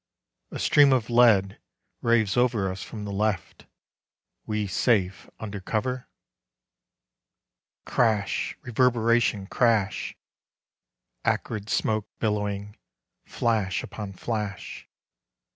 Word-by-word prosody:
A - - -6
stream 145 -2 +5
of 120 -2 0
lead 110 -5 +4 0.4
raves 115 -4 +2
Over 120 -6 +2
us 95 - -7
from 105 -2 -7
the 100 - -5
left... 100 -3 -2 0.8
(we 105 -1 -1
safe 95 -2 0
under 105 -2 -5
cover!) 125 +6 -2 1.8
Crash! 110 -5 0
Reverberation! 115 -4 +2
Crash! 110 -2 +1 1.1
Acrid 105 -1 -1
smoke 110 -1 0
billowing. 105 -1 -2 0.5
Flash 105 -5 0
upon 105 -2 -7
flash. 105 0 -5
110 Hz, 90 wpm, -26 LUFS, 100-115 Hz, 1.8 s, stream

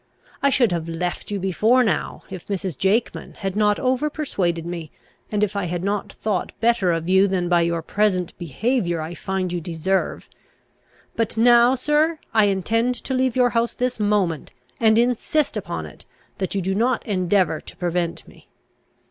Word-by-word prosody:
I 280 - +4
should 245 -6 +3
have 165 -1 -2
left 175 +2 -3
you 205 - -2
before 210 +7 +3
now, 190 -10 -1
if 185 -3 -8
Mrs. 190 -4 -3
Jakeman 200 - -1
had 195 -2 -4
not 210 -1 +2
over 260 +3 +1
persuaded 180 - -2
me, 170 -3 -5 0.4
and 210 -1 +1
if 210 -1 -1
I 200 -2 -1
had 175 0 -3
not 200 +1 -2
thought 210 -4 -2
better 230 -6 +2
of 165 0 -2
you 190 +2 +5
than 185 -2 -1
by 175 -1 +3
your 170 -1 0
present 195 -4 0
behaviour 175 - -1
I 160 +2 -5
find 185 0 -3
you 175 - -2
deserve. 175 +3 -2 0.9
But 225 -1 -1
now, 240 +2 +6
sir, 300 +5 +1 0.2
I 220 -2 +5
intend 225 +5 +1
to 265 - -5
leave 260 -1 +1
your 250 -1 +3
house 230 0 0
this 250 -2 -2
moment, 205 -7 0 0.3
and 220 -1 +4
insist 250 +5 +1
upon - - -4
it, - - -13 0.3
that 190 0 -2
you 195 - 0
do 190 +2 0
not 235 +6 +1
endeavour 185 -5 +1
to - - -13
prevent 175 -1 -2
me." - - -18
200 Hz, 175 wpm, -22 LUFS, 175-235 Hz, 0.9 s, now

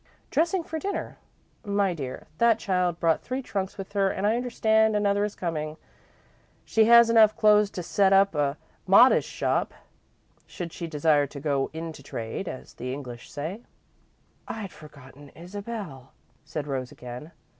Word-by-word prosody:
"Dressing 335 +4 +1
for 320 0 -5
dinner. 400 +5 -4 0.4
My 200 -2 +1
dear, 135 -6 -6
that 230 -1 +5
child 180 -5 0
brought 165 -2 +2
three 255 +2 -4
trunks 195 -4 -4
with 195 0 -8
her 195 -1 +2
and 190 - -2
I 215 +2 +3
understand 220 -3 +2
another 205 0 +2
is 210 0 -3
coming. 155 -3 -4 0.9
She 220 -1 +3
has 235 0 +7
enough 220 -2 +6
clothes 210 -1 +5
to 180 - -6
set 195 +3 +2
up 195 0 +5
a 145 -1 0 0.3
modest 235 +7 +6
shop, - - -1 0.7
should 175 -4 -7
she 170 - -5
desire 150 -2 +2
to 140 - -9
'go 140 -2 0
into 160 -2 -7
trade' 115 +6 -5
as 130 - -9
the 125 +1 -5
English 125 -3 -8
say." 160 +10 -5 0.9
"I'd 210 -4 -6
forgotten 145 -1 -14
Isabel," 185 - -8 0.3
said 150 -2 -5
Rose, 130 -3 -4
again. 125 +6 -9
185 Hz, 155 wpm, -26 LUFS, 150-215 Hz, 0.9 s, has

